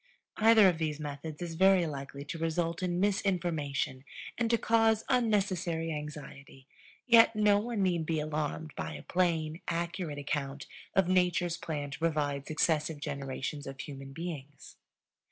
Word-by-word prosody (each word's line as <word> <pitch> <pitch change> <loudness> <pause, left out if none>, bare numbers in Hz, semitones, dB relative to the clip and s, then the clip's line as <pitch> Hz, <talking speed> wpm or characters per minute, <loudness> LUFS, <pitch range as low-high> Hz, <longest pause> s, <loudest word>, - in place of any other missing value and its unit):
Either 220 -2 +7
of 175 -3 +1
these 155 -2 -2
methods 150 +2 -6
is 170 -1 -5
very 190 +1 +5
likely 140 -1 -6
to 165 +3 -6
result 165 +1 -1
in 180 -1 -1
misinformation 170 -9 0 0.3
and 230 -1 0
to 235 - +4
cause 225 -1 +3
unnecessary 190 -9 +1
anxiety. 145 -3 -8 0.4
Yet 230 -2 +6
no 210 -1 +4
one 220 -2 -1
need 170 -4 0
be 160 -2 0
alarmed 155 0 -3
by - - -4
a - - -9
plain, 165 -3 0
accurate 170 -2 -2
account 140 -1 -3 0.3
of 195 -2 +4
Nature's 180 -2 +2
plan 150 -4 -4
to - - -7
provide 150 -4 -1
successive 155 -1 +1
generations 140 0 -4
of 135 0 -8
human 135 -1 -7
beings. 145 -3 -7
165 Hz, 145 wpm, -31 LUFS, 145-185 Hz, 0.4 s, Either